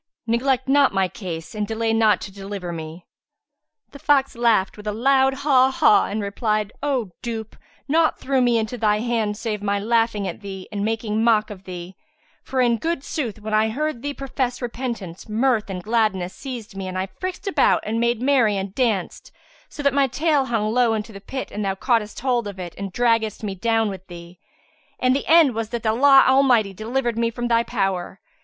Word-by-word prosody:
neglect 255 +3 +1
not 280 +1 +4
my 190 -1 +2
case 170 -4 -7
and 210 -1 -2
delay 225 +1 -1
not 220 -2 +4
to 195 - -8
deliver 195 -2 -6
me." 160 +1 -8 0.9
The 280 - -12
fox 275 -3 +2
laughed 225 -5 +2
with 210 0 -10
a - - +1
loud 265 +4 +3
haw 260 -3 +5
haw 265 -5 +4
and 210 +1 -3
replied, 210 +1 -1
"O 260 -9 -1
dupe, 225 -2 -5 0.3
naught 320 +2 +2
threw 265 -1 +1
me 240 -1 +3
into 225 +2 -3
thy 210 -1 +2
hands 220 -2 -1
save 215 -3 -3
my 200 0 0
laughing 225 -1 +1
at 180 - -6
thee 190 -2 -8
and 200 -1 -3
making 220 0 -1
mock 220 -2 +3
of 190 -2 -11
thee; 180 0 -8 0.5
for 260 -1 -1
in 240 -2 +3
good 325 +2 -2
sooth 240 - -4
when 215 +1 -5
I 215 +1 +3
heard 295 +1 -2
thee 285 +1 -4
profess 260 -2 -3
repentance, 235 -8 -5
mirth 225 -1 +1
and 180 -2 -5
gladness 210 -5 0
seized 245 -7 -8
me 195 -1 -5
and 185 0 -4
I 185 - -1
frisked 365 - -6
about 395 - +2
and 225 +2 -1
made 235 0 0
merry 250 -7 +3
and 190 0 -4
danced, 220 -7 -1 0.4
so 290 - -7
that 280 -1 +3
my 280 -1 +3
tail 290 +1 +1
hung 220 -3 -1
low 240 -2 +3
into 215 +1 -5
the 195 - -10
pit 265 +6 -6
and 210 - -4
thou 195 -1 -1
caughtest 225 0 0
hold 245 -4 0
of 200 -1 -7
it 175 -2 -6
and 195 -1 -6
draggedst 230 -1 +1
me 200 -2 -2
down 225 +3 +1
with 190 -2 -7
thee. 170 0 -11 0.6
And 255 +1 +2
the 275 - -3
end 320 -5 +6
was 225 -1 -3
that 235 -1 -5
Allah 270 +5 +6
Almighty 255 -7 +4
delivered 235 +3 -2
me 230 0 +2
from 240 +1 -4
thy 230 0 +4
power. 195 -5 -2
225 Hz, 200 wpm, -22 LUFS, 200-255 Hz, 0.9 s, end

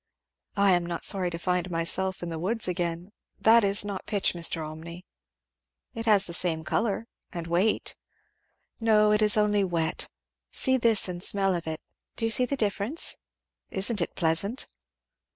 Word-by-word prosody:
"I 200 -1 +4
am 175 -1 +2
not 170 -1 -2
sorry 185 -3 +2
to 170 - -6
find 180 +1 -2
myself 175 +2 -1
in 175 - -4
the 165 -1 -5
woods 220 +6 -1
again. 175 +1 -3 0.3
That 225 +1 +5
is 200 +1 +4
not 200 -2 -6
pitch, 205 -2 +1
Mr. 165 -2 -1
Olmney." 170 +3 -10 0.9
"It 225 0 -6
has 205 -3 +5
the 170 - -6
same 165 -2 0
colour, 225 +5 -1 0.3
and 170 -2 -6
weight." 175 +6 0 0.8
"No, 215 -2 +3
it 210 0 +2
is 210 0 +5
only 210 -1 +2
wet 170 -3 -1 0.4
see 260 -1 +3
this 230 -5 +3
and 175 -1 -6
smell 195 0 +2
of 170 -2 -4
it 160 0 -4 0.3
do 225 - -2
you 225 - 0
see 250 +3 +5
the 280 - -2
difference? 210 +7 0 0.5
Isn't 200 +1 +1
it - - -3
pleasant?" 175 - -1
190 Hz, 170 wpm, -26 LUFS, 170-210 Hz, 0.9 s, That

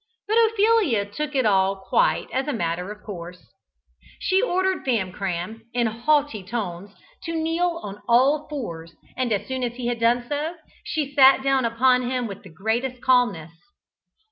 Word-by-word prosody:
But 425 - -1
Ophelia 420 - +2
took 295 +8 -5
it 260 -3 +2
all 195 -1 +3
quite 485 - +1
as 265 +2 -1
a 295 - -1
matter 180 -3 -2
of 210 0 -11
course. 175 - -9 0.6
She 380 +1 +1
ordered 375 -4 0
Famcram, 195 -3 -2
in 240 -1 +2
haughty 240 +2 +1
tones, 200 -2 -5 0.3
to 330 -2 -4
kneel 335 +2 0
on 205 0 -8
all 275 +6 +4
fours, 170 - -6 0.2
and 255 -2 -1
as 205 - -1
soon 260 0 -3
as 240 -1 -2
he 250 -1 -6
had 240 -1 -1
done 240 +1 +2
so, 300 +4 -2 0.3
she 290 -3 -3
sat 270 -1 +6
down 270 -2 +2
upon 250 +2 +3
him 255 -1 -1
with 200 -4 -7
the 195 - -13
greatest 225 +9 -2
calmness. 240 -11 +2
245 Hz, 165 wpm, -24 LUFS, 200-290 Hz, 0.6 s, sat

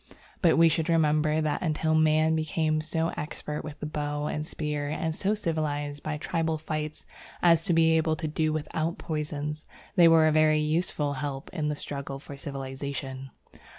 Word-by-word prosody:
But 170 -3 +4
we 165 0 +7
should 160 0 +1
remember 155 -1 +3
that 155 -1 -1
until 160 -1 0
man 155 0 +4
became 155 0 0
so 160 +1 -1
expert 150 0 -5
with 150 -1 -8
the - - -4
bow 150 -1 -2
and 150 0 -2
spear 150 -2 -3
and 160 +1 -2
so 205 +4 0
civilized 145 -6 -2
by 155 -1 -3
tribal 160 0 -1
fights 155 0 -4 0.4
as 165 -2 +6
to 190 - +1
be 165 0 +5
able 160 0 +1
to 155 0 -4
do 155 +1 0
without 155 +2 -2
poisons, 150 -1 -4 0.3
they 175 -3 +7
were 165 -1 +6
a 155 - +4
very 155 0 +4
useful 150 -1 0
help 135 0 -5
in 155 -4 -1
the 150 - -1
struggle 140 -1 -5
for 140 +1 -10
civilization. 135 -1 -5
155 Hz, 175 wpm, -28 LUFS, 150-160 Hz, 0.4 s, we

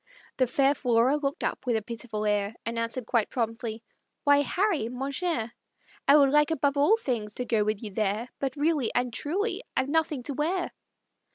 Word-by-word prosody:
The 255 - +3
fair 275 +3 +3
Flora 250 0 +2
looked 280 -1 -3
up, - - -2
with 240 - +2
a 220 - +1
pitiful 220 -1 -5
air, 205 +1 0
And 230 0 -2
answered 230 +1 -3
quite 230 -2 +1
promptly, 230 -1 -3 0.4
"Why, 285 -1 +5
Harry, 345 - 0
mon 265 +3 -4
cher, 280 -8 -2 0.5
I 280 - +7
should 280 -2 +6
like 295 +1 +4
above 285 -3 +1
all 295 +11 +4
things 230 - -3
to 250 - -3
go 225 -3 +2
with 215 +1 -2
you 210 - -5
there, 215 +4 -1
But 270 -1 -2
really 295 -4 +1
and 245 -1 0
truly 385 - -1 0.2
I've 265 - +1
nothing 310 -4 0
to 285 - -3
wear." 345 +6 -1
255 Hz, 190 wpm, -27 LUFS, 230-290 Hz, 0.5 s, I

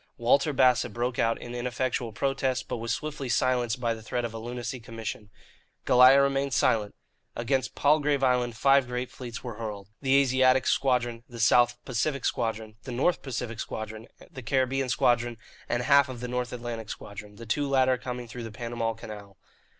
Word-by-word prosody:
Walter 140 +6 +3
Bassett 125 -4 +3
broke 120 +1 -2
out 115 0 +1
in 120 - -8
ineffectual 125 -1 -2
protest, 135 +2 -1
but - - -3
was 115 0 -3
swiftly 145 -4 -4
silenced 120 -1 +1
by 120 -2 0
the 110 - -9
threat 120 +2 -2
of 115 - -5
a 115 - -5
lunacy 120 +2 -5
commission. 115 -2 -7 0.6
Goliah 125 +2 +7
remained 140 -1 0
silent. 105 -2 +2 0.4
Against 130 +3 -1
Palgrave 145 -1 +2
Island 125 -2 +1
five 135 +1 +4
great 125 +1 -4
fleets 120 -3 -8
were 120 -4 -7
hurled 105 -3 -6
the 135 -1 +3
Asiatic 130 -1 +4
Squadron, 120 -3 +1
the 120 -1 -9
South 120 +2 +4
Pacific 140 +4 -1
Squadron, 110 -3 -2
the 130 - -8
North 135 +9 +1
Pacific 120 -4 -5
Squadron, 110 +1 -6 0.2
the 130 - -8
Caribbean 130 +2 0
Squadron, 120 -1 +2 0.3
and 120 - 0
half 140 0 +5
of 125 -2 -7
the 125 - -4
North 125 0 -2
Atlantic 120 -3 -6
Squadron, 105 0 -8
the 115 +2 -10
two 140 +5 -1
latter 130 -1 +3
coming 125 -1 -5
through 120 +2 -8
the 115 - -7
Panama 115 0 -3
Canal. 105 -3 -10
120 Hz, 175 wpm, -27 LUFS, 115-130 Hz, 0.6 s, Goliah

